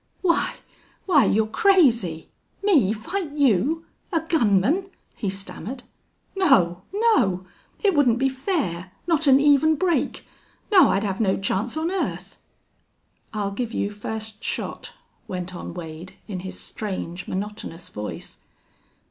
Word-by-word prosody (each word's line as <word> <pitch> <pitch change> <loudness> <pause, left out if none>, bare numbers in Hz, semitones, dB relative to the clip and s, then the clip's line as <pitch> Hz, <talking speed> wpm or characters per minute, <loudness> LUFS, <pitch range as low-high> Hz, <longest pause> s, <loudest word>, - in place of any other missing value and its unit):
"Why 340 -2 +2 0.5
why 320 -7 +5
you're 220 +1 +3
crazy! 235 - +3 0.3
Me 295 - +4
fight 290 - -4
you 285 - +2 0.3
a 330 -3 +1
gunman," 310 - +2 0.3
he 205 - -2
stammered. 200 +6 -6 0.5
"No 190 - +3
no. 390 - +2 0.4
It 400 -2 +4
wouldn't 260 -7 +4
be 270 +2 +2
fair. 260 - -2
Not 330 -3 +1
an 270 0 +7
even 295 +2 +5
break!... 345 +2 0 0.5
No, 380 -4 +7
I'd 195 - +1
have 195 0 -2
no 190 -3 +2
chance 200 +7 -1
on 325 +3 -1
earth!" 385 - -3 1.0
"I'll 205 -2 -2
give 230 +3 -4
you 200 - -1
first 215 +1 -6
shot," - - -4 0.3
went 185 0 -4
on 175 - -6
Wade, 165 +1 -8
in 195 -4 -4
his 185 +1 -7
strange, 185 -4 -5
monotonous 200 -3 -5
voice. 105 0 -7
225 Hz, 130 wpm, -24 LUFS, 190-320 Hz, 1.0 s, an